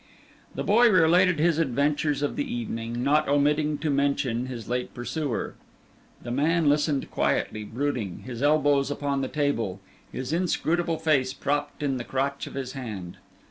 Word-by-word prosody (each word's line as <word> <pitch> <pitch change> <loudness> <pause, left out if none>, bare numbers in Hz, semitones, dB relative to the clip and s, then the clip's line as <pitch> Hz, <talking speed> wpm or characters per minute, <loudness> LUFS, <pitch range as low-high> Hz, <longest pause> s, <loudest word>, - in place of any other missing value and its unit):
The - - -2
boy 235 +4 +5
related 180 -1 +4
his 165 +1 +2
adventures 145 0 +1
of 145 - -1
the 285 -3 -3
evening, 120 - -3
not 150 +3 +3
omitting 150 +1 +2
to 150 +1 -1
mention 140 -3 0
his 120 -4 -7
late 125 +1 -3
pursuer. 130 +1 -3 0.7
The 120 - -5
man 155 +5 +2
listened 145 -1 +1
quietly, 110 - 0
brooding, 120 -4 -3
his 125 -1 -6
elbows 145 -1 +3
upon 140 -1 -1
the 130 - -1
table, 115 -11 -1 0.3
his 130 +4 -4
inscrutable 170 -1 0
face 145 -5 +1
propped 145 +1 -2
in 135 -2 0
the 120 - -4
crotch 135 +2 -2
of - - -10
his 130 -2 -4
hand. 105 -10 -7
145 Hz, 155 wpm, -26 LUFS, 130-155 Hz, 0.7 s, boy